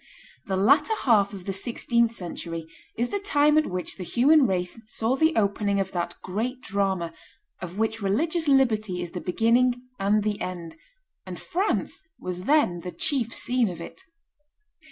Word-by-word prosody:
The 190 -1 0
latter 285 - +4
half 205 -5 +4
of 190 -3 -9
the 195 - -2
sixteenth 235 +2 0
century 170 -5 -6 0.3
is 240 +2 0
the 405 - -1
time 300 -7 +3
at 310 0 +3
which 180 -1 -4
the 185 - -5
human 270 - +4
race 180 +3 -2
saw 225 +3 0
the 320 +3 +2
opening 200 -1 +1
of 195 -1 -2
that 175 -1 -3
great 230 +7 -3
drama, 190 -4 -1 0.5
of 180 +1 -7
which 225 0 -1
religious 320 - 0
liberty 215 -9 +2
is 175 - -7
the 180 - -5
beginning 240 +6 +2 0.2
and 205 +2 +2
the 210 -1 -2
end; 170 -3 -5 0.5
and - - -6
France 380 +4 -1 0.2
was 180 0 -5
then 290 - +3
the 180 +1 -6
chief 245 - -1
scene 245 -3 0
of 175 - -7
it. 170 - -9
215 Hz, 165 wpm, -26 LUFS, 185-255 Hz, 0.5 s, latter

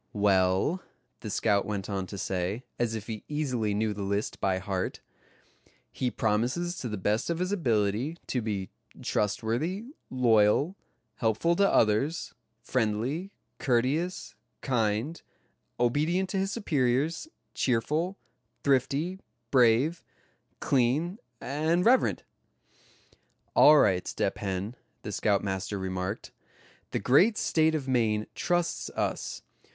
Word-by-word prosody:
"Well," 100 - +2 0.4
the - - -6
scout 100 -1 +2
went 100 -2 -4
on 95 -2 -3
to 100 - -7
say, 95 +5 -2 0.2
as 115 -2 0
if 110 -2 -5
he 110 -2 -6
easily 130 -9 -1
knew 110 0 0
the 105 - -6
list 100 +1 -2
by 95 -1 +1
heart; 95 0 -3 0.9
"he 125 - -1
promises 120 - 0
to 125 - -4
the 105 - -3
best 105 - 0
of 170 - 0
his 180 +2 -1
ability 120 - 0
to 125 - -1
be 100 -4 -3 0.3
trustworthy, 125 - -1 0.2
loyal, 120 - +3 0.4
helpful 115 +10 +1
to 200 0 +4
others, 115 +10 +2 0.3
friendly, 130 - -1 0.3
courteous, 145 +8 0 0.3
kind, 120 +4 0 0.6
obedient 155 +10 +1
to 195 - -2
his 195 +1 0
superiors, 150 - 0 0.3
cheerful, 150 - 0 0.5
thrifty, 145 +7 +1 0.3
brave, 130 +6 +4 0.6
clean 145 - +1 0.2
and 160 +6 0
reverent." 255 +3 +3 1.3
"All 150 0 +8
right, 95 -9 +3
Step 100 +1 -1
Hen," 100 +2 -3 0.3
the 105 - -5
scoutmaster 100 -1 0
remarked, 95 +1 -4 0.6
"the - - -2
great 185 - +4
State 160 0 +2
of 140 -4 -3
Maine 110 -4 +1
trusts 175 -1 -1
us. - - -2
120 Hz, 115 wpm, -28 LUFS, 105-160 Hz, 1.3 s, All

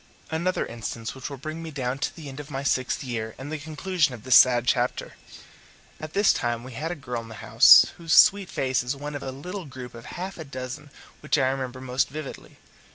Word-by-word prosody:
Another 170 +3 0
instance 115 -1 -6
which 130 +1 -7
will 140 - -7
bring 155 +4 -6
me 165 - -6
down 135 -3 -3
to 150 - -2
the 155 -3 -9
end 135 +1 -8
of 150 0 -8
my 135 -1 -4
sixth 130 -2 0
year 110 -4 -4
and 135 +3 -8
the 155 - -3
conclusion 155 -1 -1
of 115 - -14
this 130 -1 +1
sad 120 -2 +7
chapter. 125 0 0 0.9
At 155 0 -8
this 200 0 +4
time 120 -1 -2
we 130 - -9
had 150 +7 -4
a 175 - -3
girl 125 -5 -5
in 115 - -12
the 110 - -9
house, - - +7
whose 165 -1 -6
sweet 200 -2 +6
face 130 -1 0
is 125 +3 -3
one 145 +2 -6
of 145 - -5
a - - -5
little 180 +8 -7
group 130 -3 -9
of 115 -1 -11
half 185 +1 -6
a - - -5
dozen 135 +1 -7 0.3
which 150 - 0
I 130 -2 +2
remember 130 -1 -4
most 130 0 0
vividly. 150 0 -8
135 Hz, 225 wpm, -25 LUFS, 125-155 Hz, 0.9 s, sad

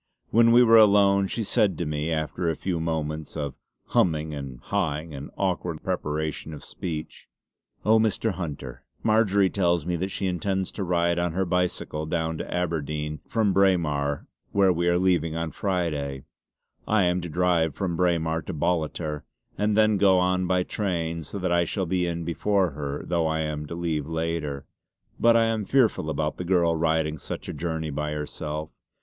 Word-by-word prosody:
When 115 0 +5
we 120 +1 +7
were 115 -1 +7
alone 100 -2 +5
she 115 - -2
said 100 -1 +2
to 85 - -2
me 75 +1 -2
after 80 +2 -1
a 80 - 0
few 90 0 -2
moments 80 -1 -3
of 70 -2 -3 0.4
'hum'ing 80 -3 +2
and 70 -4 -6
'ha'ing 80 -2 -2
and 70 0 -7
awkward 90 -4 -2
preparation 75 +1 -3
of 75 - -11
speech: 80 -4 -6 0.6
"Oh 110 +1 +5
Mr. 110 0 +1
Hunter, 70 -8 -6 0.2
Marjory 105 -3 +4
tells 85 -4 +1
me 90 0 -1
that 95 +3 -2
she 95 - -3
intends 95 +1 -1
to 100 - -4
ride 85 -1 +1
on 85 -2 0
her 95 +2 0
bicycle 90 -3 -1
down 80 -1 -1
to - - -5
Aberdeen 75 -3 -2
from 110 -4 +1
Braemar 75 -7 +2 0.3
where 95 -2 +4
we 85 +1 0
are 85 0 +3
going 85 -3 +1
on 80 -1 -2
Friday. 75 -8 -2 0.6
I 105 -2 +3
am 90 0 +1
to 85 - -5
drive 85 -2 +1
from 95 -4 -2
Braemar 80 -2 +1
to - - -4
Ballater 80 -2 -1 0.3
and 105 +1 +1
then 110 -1 +4
go 95 -1 +5
on 90 0 +1
by 90 0 +2
train 85 -5 -2
so 80 +6 -5
that 90 -2 -1
I 85 0 +4
shall 95 +3 -2
be 90 0 0
in 85 0 -3
before 95 +2 +1
her, 70 0 -4
though 85 -2 +1
I 80 0 0
am 75 -1 -3
to 85 - -6
leave 80 -4 -2
later. 80 -3 -3 0.5
But 115 0 +5
I 115 - +4
am 115 -1 0
fearful 115 - +2
about 75 0 -1
the - - -4
girl 85 -2 +2
riding 80 -1 0
such - - -6
a - - -4
journey 80 -2 -3
by 75 +1 -2
herself. 75 +1 -5
85 Hz, 180 wpm, -26 LUFS, 75-95 Hz, 0.6 s, we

